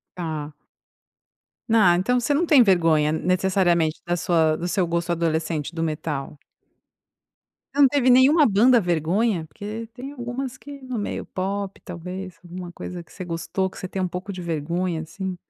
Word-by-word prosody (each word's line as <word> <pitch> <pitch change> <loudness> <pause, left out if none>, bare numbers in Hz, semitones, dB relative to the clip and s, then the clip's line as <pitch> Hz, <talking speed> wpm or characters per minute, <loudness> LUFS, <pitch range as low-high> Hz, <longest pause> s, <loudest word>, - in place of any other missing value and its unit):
Tá. 155 -4 -5 1.2
Ah, 185 -6 +6
então 245 +7 +1
você 285 +4 +1
não 335 +5 +2
tem 290 -6 +6
vergonha 165 -6 +3
necessariamente 175 -1 +1
da 175 0 0
sua 160 -2 +2
do 175 +3 -3
seu 180 -1 +1
gosto 170 +1 -1
adolescente 160 -1 -1
do 165 - -3
metal? 150 -2 -3 1.3
Você 285 - 0
não 275 - +8
teve 260 -2 +3
nenhuma 280 +5 +6
banda 230 +4 +5
vergonha? 175 +2 0
Porque 215 +6 -7
tem 265 +3 -7
algumas 250 0 -5
que 285 -1 -10
no 255 -3 -4
meio 205 - -3
pop 195 +1 -4
talvez, 180 +1 -7
alguma 175 0 -7
coisa 175 0 -7
que - - -21
você 185 - -7
gostou 170 +3 -2
que - - -13
você 185 - -5
tem 190 - -4
um 180 - 0
pouco 180 +3 -5
de 185 - -7
vergonha, 170 +1 -2
assim. 185 +3 -5
180 Hz, 165 wpm, -23 LUFS, 165-225 Hz, 1.3 s, não